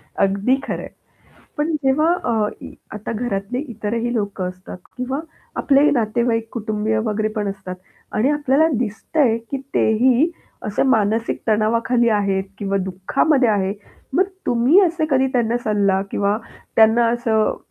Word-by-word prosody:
अगदी 200 Hz, +6 st, +2 dB
खरं -, -, -4 dB
आहे, -, -, -7 dB, 0.7 s
पण 300 Hz, +2 st, 0 dB
जेव्हा 275 Hz, +4 st, +3 dB, 0.2 s
अ, 220 Hz, -3 st, +1 dB
इ -, -, -9 dB, 0.2 s
आता 215 Hz, +1 st, -5 dB
घरातले 215 Hz, 0 st, -3 dB
इतरही 230 Hz, +2 st, -2 dB
लोकं 205 Hz, -4 st, -2 dB
असतात 185 Hz, 0 st, -10 dB, 0.2 s
किंवा 255 Hz, +2 st, -2 dB, 0.4 s
आपले 285 Hz, +1 st, +4 dB
नातेवाईक 230 Hz, -2 st, 0 dB
कुटुंबीय 215 Hz, -1 st, -1 dB
वगैरे 215 Hz, 0 st, 0 dB
पण 210 Hz, -2 st, -1 dB
असतात 190 Hz, -2 st, -7 dB, 0.4 s
आणि 225 Hz, +6 st, +2 dB
आपल्याला 295 Hz, +1 st, +3 dB
दिसतंय 235 Hz, +2 st, 0 dB
की 275 Hz, -, -1 dB, 0.2 s
ते -, -, +3 dB
ही 260 Hz, +5 st, +4 dB, 0.4 s
असे 210 Hz, -1 st, 0 dB
मानसिक 220 Hz, +1 st, 0 dB
तणावाखाली 230 Hz, +3 st, +2 dB
आहेत 200 Hz, -3 st, +1 dB
किंवा 195 Hz, -2 st, -1 dB
दुःखामध्ये 245 Hz, -, +1 dB
आहे, 195 Hz, -2 st, +1 dB, 0.4 s
मग 355 Hz, +7 st, +4 dB, 0.2 s
तुम्ही 245 Hz, +10 st, +4 dB
असे 335 Hz, -2 st, 0 dB
कधी 265 Hz, -2 st, +3 dB
त्यांना 235 Hz, -1 st, +1 dB
सल्ला 200 Hz, -3 st, +2 dB
किंवा 200 Hz, +1 st, +1 dB, 0.4 s
त्यांना 225 Hz, +1 st, +5 dB
असं 230 Hz, -2 st, +1 dB
225 Hz, 140 wpm, -20 LUFS, 205-255 Hz, 0.7 s, त्यांना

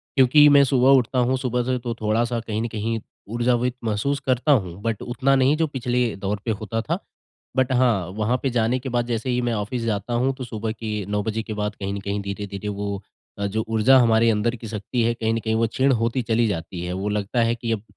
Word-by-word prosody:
क्योंकि 140 Hz, +3 st, +6 dB
मैं 140 Hz, -1 st, +7 dB
सुबह 130 Hz, -1 st, +3 dB
उठता 125 Hz, +1 st, 0 dB
हूँ 130 Hz, +2 st, +2 dB
सुबह 125 Hz, -1 st, -1 dB
से 130 Hz, 0 st, 0 dB
तो 120 Hz, -1 st, -3 dB
थोड़ा-सा 115 Hz, +2 st, +1 dB
कहीं 110 Hz, -1 st, -3 dB
न 115 Hz, -, -1 dB
कहीं 110 Hz, +1 st, -2 dB, 0.3 s
ऊर्जावित 120 Hz, +1 st, +1 dB
महसूस 115 Hz, +6 st, -1 dB
करता 130 Hz, +3 st, +2 dB
हूँ, 95 Hz, -7 st, +1 dB
बट 115 Hz, -2 st, -2 dB
उतना 135 Hz, +3 st, +1 dB
नहीं 135 Hz, +3 st, +4 dB
जो 160 Hz, -1 st, +1 dB
पिछले 125 Hz, -4 st, -1 dB
दौर 100 Hz, +1 st, -3 dB
पे 115 Hz, -, 0 dB
होता 110 Hz, +2 st, -3 dB
था। 165 Hz, +8 st, -2 dB, 0.6 s
बट 130 Hz, 0 st, +2 dB
हाँ। 120 Hz, -8 st, +2 dB
वहाँ 110 Hz, +4 st, +1 dB
पे 135 Hz, -, 0 dB
जाने 120 Hz, +1 st, +1 dB
के 130 Hz, +1 st, -6 dB
बाद 120 Hz, -1 st, 0 dB
जैसे 120 Hz, +1 st, -2 dB
ही 125 Hz, 0 st, +1 dB
मैं -, -, 0 dB
ऑफ़िस 110 Hz, +3 st, -3 dB
जाता 110 Hz, +2 st, -2 dB
हूँ 135 Hz, +1 st, +2 dB
तो 130 Hz, -1 st, -6 dB
सुबह 110 Hz, -1 st, -4 dB
के 105 Hz, -3 st, -4 dB
9 105 Hz, 0 st, 0 dB
बजे 110 Hz, +1 st, -2 dB
के 110 Hz, -, -6 dB
बाद 105 Hz, 0 st, -2 dB
कहीं 100 Hz, 0 st, -4 dB
न -, -, -3 dB
कहीं 100 Hz, +1 st, -3 dB
धीरे-धीरे 100 Hz, +1 st, -5 dB
वो 100 Hz, -1 st, -4 dB, 0.4 s
अ, 100 Hz, -, -1 dB
जो 110 Hz, +2 st, -2 dB
ऊर्जा 115 Hz, +4 st, +4 dB
हमारे 115 Hz, -1 st, +4 dB
अंदर 110 Hz, +3 st, +1 dB
की 115 Hz, -, -9 dB
शक्ति 115 Hz, +3 st, -2 dB
है 115 Hz, +1 st, +2 dB
कहीं 115 Hz, -1 st, -1 dB
न -, -, 0 dB
कहीं 110 Hz, 0 st, 0 dB
वो 115 Hz, +1 st, +2 dB
क्षीण 130 Hz, +4 st, +1 dB
होती 115 Hz, +2 st, 0 dB
चली 115 Hz, +1 st, +1 dB
जाती 85 Hz, -2 st, -4 dB
है। 90 Hz, -, -3 dB
वो 95 Hz, +3 st, -2 dB
लगता 105 Hz, +3 st, -1 dB
है 115 Hz, +1 st, +2 dB
कि 115 Hz, -1 st, -3 dB
अब 105 Hz, -2 st, -2 dB
115 Hz, 240 wpm, -23 LUFS, 105-125 Hz, 0.6 s, मैं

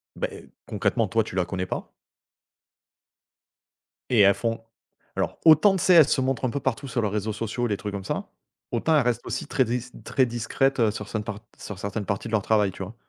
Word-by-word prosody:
beh -, -, -5 dB, 0.2 s
concrètement -, -, 0 dB
toi -, -, +1 dB
tu -, -, -9 dB
la 90 Hz, -, +1 dB
connais 95 Hz, +1 st, -3 dB
pas». -, -, -5 dB, 2.2 s
Et 120 Hz, -, +4 dB
elles 100 Hz, 0 st, +7 dB
font 115 Hz, +3 st, -2 dB, 0.6 s
alors -, -, -2 dB
autant, 165 Hz, +5 st, +7 dB
tu 180 Hz, -, -2 dB
sais, 185 Hz, -, +5 dB
elles 160 Hz, -5 st, +8 dB
se -, -, +2 dB
montrent 130 Hz, -1 st, -1 dB
un 130 Hz, -, +1 dB
peu 140 Hz, +3 st, -3 dB
partout 130 Hz, +1 st, -2 dB
sur 120 Hz, -2 st, -2 dB
leurs 105 Hz, -, 0 dB
réseaux 105 Hz, +1 st, -1 dB
sociaux, 115 Hz, +3 st, -2 dB
les 105 Hz, -3 st, -1 dB
trucs 105 Hz, 0 st, -6 dB
comme 100 Hz, -1 st, -5 dB
ça, -, -, -4 dB, 0.4 s
autant 140 Hz, +7 st, +1 dB
elles 145 Hz, -, +4 dB
restent 120 Hz, -1 st, -1 dB
aussi -, -, -3 dB
très 135 Hz, -2 st, +2 dB
dis 120 Hz, +1 st, -1 dB, 0.2 s
très 130 Hz, -, +2 dB
discrètes, 120 Hz, +3 st, 0 dB
heu, 110 Hz, -2 st, +4 dB
sur 105 Hz, -1 st, -7 dB
certaines 110 Hz, -2 st, -3 dB
part 105 Hz, 0 st, -6 dB, 0.2 s
sur 105 Hz, -, -7 dB
certaines 100 Hz, +1 st, -4 dB
parties 100 Hz, +3 st, -3 dB
de -, -, -8 dB
leur 110 Hz, -2 st, +2 dB
travail, 105 Hz, -3 st, +2 dB
tu 95 Hz, -, -8 dB
vois? 100 Hz, -, -10 dB
115 Hz, 220 wpm, -25 LUFS, 105-130 Hz, 2.2 s, elles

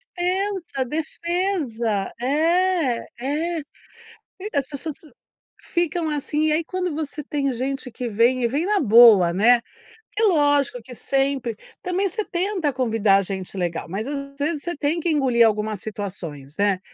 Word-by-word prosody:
Defesa, 360 Hz, -6 st, -1 dB
defesa 305 Hz, -, -2 dB
é 320 Hz, -1 st, +2 dB
é, 310 Hz, +6 st, -1 dB, 0.6 s
e 415 Hz, +2 st, -10 dB
as 275 Hz, -2 st, +1 dB
pessoas 300 Hz, +1 st, -5 dB, 0.6 s
ficam, 345 Hz, -1 st, -1 dB
assim, 300 Hz, +1 st, -1 dB
e 310 Hz, -, +2 dB
aí 325 Hz, +2 st, +1 dB
quando 365 Hz, 0 st, -3 dB
você 300 Hz, -1 st, -4 dB
tem 280 Hz, -1 st, -1 dB
gente 260 Hz, +1 st, -3 dB
que 245 Hz, +2 st, -5 dB
vem 235 Hz, +3 st, +2 dB
e -, -, +4 dB
vem 285 Hz, +8 st, -1 dB
na 415 Hz, +1 st, +2 dB
boa, 220 Hz, -, +7 dB
né, 230 Hz, +6 st, +5 dB, 0.6 s
é 450 Hz, -, +2 dB
lógico 290 Hz, -, +3 dB
que 250 Hz, +2 st, -11 dB
sempre 270 Hz, -4 st, 0 dB, 0.3 s
também 375 Hz, 0 st, 0 dB
você 430 Hz, +4 st, -2 dB
tenta 360 Hz, -4 st, -1 dB
convidar 225 Hz, -6 st, +2 dB
gente 190 Hz, 0 st, -5 dB
legal, 175 Hz, -2 st, -2 dB
mas 205 Hz, +7 st, -3 dB
às 275 Hz, -1 st, -5 dB
vezes 295 Hz, 0 st, -1 dB
você 345 Hz, -, -3 dB
tem 300 Hz, +4 st, 0 dB
que 340 Hz, -, -1 dB
engolir 260 Hz, -6 st, +4 dB
algumas 215 Hz, -1 st, 0 dB
situações, 175 Hz, -9 st, -7 dB
né? 200 Hz, -2 st, +2 dB
275 Hz, 150 wpm, -23 LUFS, 230-335 Hz, 0.6 s, boa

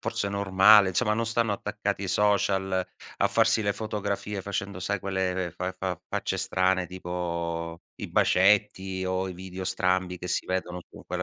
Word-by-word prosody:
forse 100 Hz, -, -2 dB
normale, 100 Hz, +1 st, +6 dB
insomma, 105 Hz, +4 st, +1 dB
non 115 Hz, -, 0 dB
stanno 115 Hz, -1 st, 0 dB
attaccati 100 Hz, 0 st, -3 dB
ai 100 Hz, -, -3 dB
social 95 Hz, -2 st, +1 dB, 0.3 s
a -, -, +3 dB
farsi 110 Hz, -, +3 dB
le 100 Hz, -1 st, +1 dB
fotografie 105 Hz, -2 st, -3 dB
facendo, 100 Hz, -1 st, -4 dB
sai, 100 Hz, +3 st, -1 dB
quelle 95 Hz, -2 st, -2 dB
fa 90 Hz, +1 st, -3 dB
fa 95 Hz, -3 st, -2 dB
facce -, -, -2 dB
strane 95 Hz, 0 st, +1 dB
tipo 85 Hz, -2 st, -4 dB, 0.2 s
i -, -, -5 dB
bacetti, 95 Hz, -1 st, +2 dB
o 95 Hz, 0 st, -1 dB
i -, -, -5 dB
video 95 Hz, +1 st, -7 dB
strambi 90 Hz, -1 st, 0 dB
che 90 Hz, -, -6 dB
si -, -, -1 dB
vedono 90 Hz, -1 st, -3 dB
con -, -, -13 dB
quella -, -, -3 dB
95 Hz, 165 wpm, -27 LUFS, 90-100 Hz, 0.3 s, normale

